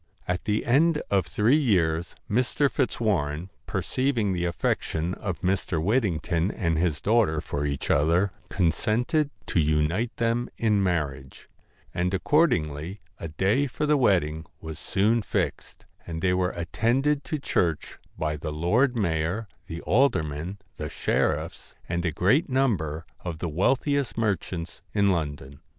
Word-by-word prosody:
At 90 Hz, 0 st, -2 dB
the 105 Hz, 0 st, 0 dB
end 150 Hz, +5 st, +4 dB
of 100 Hz, -2 st, +2 dB
three 110 Hz, +6 st, +3 dB
years 90 Hz, -, +1 dB
Mr. 125 Hz, +5 st, +1 dB
Fitzwarren, 95 Hz, -, 0 dB, 0.2 s
per -, -, -2 dB
ceiving 125 Hz, -7 st, 0 dB
the 90 Hz, -1 st, -1 dB
affection 85 Hz, 0 st, -1 dB
of 95 Hz, -4 st, -4 dB
Mr. 90 Hz, -2 st, 0 dB
Whittington 90 Hz, -4 st, +1 dB
and 85 Hz, -6 st, -1 dB
his 80 Hz, -4 st, +1 dB
daughter 105 Hz, -8 st, +3 dB
for 75 Hz, -1 st, -3 dB
each 70 Hz, -1 st, -2 dB
other, 85 Hz, +7 st, +3 dB, 0.2 s
consented 120 Hz, -, +1 dB, 0.2 s
to -, -, 0 dB
unite 80 Hz, +9 st, +1 dB
them 115 Hz, +1 st, 0 dB
in 105 Hz, -3 st, +2 dB
marriage; 75 Hz, -8 st, -2 dB, 0.5 s
and 90 Hz, +1 st, 0 dB
accordingly 90 Hz, -, +1 dB, 0.2 s
a 85 Hz, -, -4 dB
day 95 Hz, -, +1 dB
for 150 Hz, +3 st, -2 dB
the 150 Hz, 0 st, +4 dB
wed 100 Hz, -, +4 dB
ding 75 Hz, +1 st, -6 dB
was 80 Hz, -2 st, -7 dB
soon 110 Hz, +4 st, +2 dB
fixed, -, -, -3 dB, 0.2 s
and 80 Hz, -1 st, -5 dB
they 90 Hz, -1 st, +3 dB
were 90 Hz, 0 st, +1 dB
attended 125 Hz, -, 0 dB
to 155 Hz, -, -2 dB
church 85 Hz, -, -1 dB, 0.2 s
by 75 Hz, -1 st, -1 dB
the 75 Hz, +1 st, -4 dB
lord 110 Hz, -, +2 dB
mayor, 85 Hz, +2 st, 0 dB, 0.2 s
the 85 Hz, +1 st, -6 dB
aldermen, 90 Hz, -, +1 dB, 0.2 s
the -, -, -4 dB
sheriffs, -, -, -1 dB
and 85 Hz, 0 st, -1 dB
a 85 Hz, -, +1 dB
great 105 Hz, -, +2 dB
number 90 Hz, -, 0 dB
of 85 Hz, -3 st, -5 dB
the 85 Hz, -, -3 dB
wealthiest 130 Hz, -, +1 dB
merchants 95 Hz, -6 st, -2 dB
in 100 Hz, -1 st, +4 dB
London. 70 Hz, -5 st, -3 dB
90 Hz, 145 wpm, -26 LUFS, 80-115 Hz, 0.5 s, end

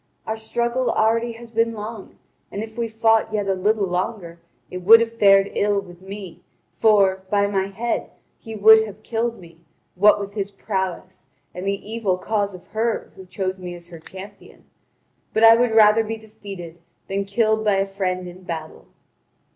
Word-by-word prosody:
Our 220 Hz, -, -2 dB
struggle 235 Hz, +3 st, -1 dB
already 230 Hz, +2 st, +1 dB
has 230 Hz, 0 st, -13 dB
been 230 Hz, 0 st, 0 dB
long; 215 Hz, 0 st, -8 dB, 0.3 s
and 200 Hz, -, -4 dB
if 220 Hz, 0 st, -10 dB
we 235 Hz, -1 st, -2 dB
had 220 Hz, -, -17 dB
fought 225 Hz, 0 st, +3 dB
yet 205 Hz, -2 st, -1 dB
a 195 Hz, -, +2 dB
little 205 Hz, +2 st, +1 dB
longer, 180 Hz, -1 st, -4 dB, 0.3 s
it 180 Hz, -, -5 dB
would 220 Hz, +6 st, +8 dB
have 230 Hz, 0 st, -1 dB
fared 195 Hz, -3 st, +4 dB
ill 205 Hz, -1 st, +1 dB
with 180 Hz, -2 st, -12 dB
me, 195 Hz, -2 st, -9 dB, 0.3 s
for, 200 Hz, -3 st, +3 dB
by 200 Hz, 0 st, +2 dB
my 195 Hz, -1 st, -1 dB
head, 225 Hz, +5 st, -3 dB, 0.3 s
he 225 Hz, -2 st, -9 dB
would 220 Hz, +1 st, +7 dB
have 210 Hz, +1 st, -12 dB
killed 235 Hz, 0 st, -2 dB
me, 170 Hz, -2 st, -16 dB, 0.3 s
what 205 Hz, +3 st, +5 dB
with 200 Hz, 0 st, -6 dB
his 200 Hz, -2 st, -3 dB
prowess 190 Hz, -2 st, -5 dB, 0.3 s
and 180 Hz, +2 st, -6 dB
the 200 Hz, 0 st, -3 dB
evil 215 Hz, -5 st, -1 dB
cause 200 Hz, 0 st, -2 dB
of 180 Hz, -, -14 dB
her 225 Hz, +1 st, -2 dB
who 190 Hz, -1 st, -13 dB
chose 190 Hz, 0 st, -3 dB
me 180 Hz, -1 st, -7 dB
as 170 Hz, 0 st, -13 dB
her 170 Hz, -2 st, -11 dB
champion. 190 Hz, +5 st, -13 dB, 0.7 s
But 220 Hz, -, +2 dB
I 225 Hz, 0 st, +9 dB
would 240 Hz, +1 st, +2 dB
rather 220 Hz, 0 st, +5 dB
be 225 Hz, +1 st, -5 dB
defeated 200 Hz, -6 st, -10 dB, 0.3 s
than 195 Hz, +1 st, -2 dB
killed 220 Hz, +1 st, +1 dB
by 210 Hz, -2 st, +2 dB
a 195 Hz, 0 st, +1 dB
friend 185 Hz, -2 st, -3 dB
in 180 Hz, +1 st, -11 dB
battle." 160 Hz, -3 st, -7 dB
205 Hz, 185 wpm, -22 LUFS, 190-220 Hz, 0.7 s, I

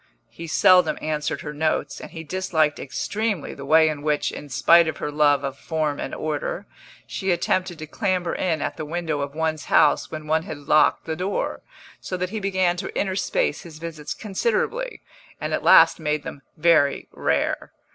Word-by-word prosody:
He 165 Hz, -, -8 dB
seldom 180 Hz, +1 st, +4 dB
answered 150 Hz, -1 st, -2 dB
her 150 Hz, -, -6 dB
notes, 155 Hz, +1 st, -1 dB
and -, -, -8 dB
he 160 Hz, -, -8 dB
disliked 160 Hz, -3 st, 0 dB
extremely 205 Hz, +5 st, -3 dB
the 140 Hz, 0 st, -9 dB
way 160 Hz, +1 st, +6 dB
in 150 Hz, -2 st, -2 dB
which, 150 Hz, 0 st, 0 dB
in 145 Hz, -, -9 dB
spite 170 Hz, +6 st, +5 dB
of 160 Hz, -, -3 dB
her 150 Hz, -, -4 dB
love 145 Hz, -2 st, +3 dB
of 135 Hz, 0 st, -4 dB
form 155 Hz, -3 st, -2 dB
and -, -, -4 dB
order, -, -, -3 dB, 0.4 s
she 195 Hz, -, -4 dB
attempted 180 Hz, 0 st, 0 dB
to 155 Hz, -, -7 dB
clamber 180 Hz, +1 st, -1 dB
in 165 Hz, -5 st, -1 dB
at -, -, -3 dB
the -, -, -4 dB
window 160 Hz, -1 st, -2 dB
of 140 Hz, +1 st, -5 dB
one's 160 Hz, -1 st, -1 dB
house 150 Hz, -, +3 dB
when 155 Hz, -1 st, -7 dB
one 160 Hz, +1 st, +1 dB
had 160 Hz, -3 st, -7 dB
locked 145 Hz, +1 st, +3 dB
the 160 Hz, -, -3 dB
door; 185 Hz, +4 st, -2 dB, 0.4 s
so 185 Hz, -, -5 dB
that 180 Hz, +1 st, -3 dB
he 220 Hz, -, -3 dB
began 185 Hz, -3 st, +1 dB
to 195 Hz, -, -4 dB
interspace 200 Hz, -, 0 dB
his 165 Hz, -4 st, -11 dB
visits 155 Hz, -2 st, -6 dB
considerably, 235 Hz, -, -2 dB, 0.4 s
and -, -, -3 dB
at -, -, 0 dB
last -, -, +6 dB
made 150 Hz, -1 st, -1 dB
them 140 Hz, -, -8 dB, 0.2 s
very 155 Hz, -4 st, +3 dB
rare. -, -, -1 dB
160 Hz, 185 wpm, -23 LUFS, 150-185 Hz, 0.4 s, way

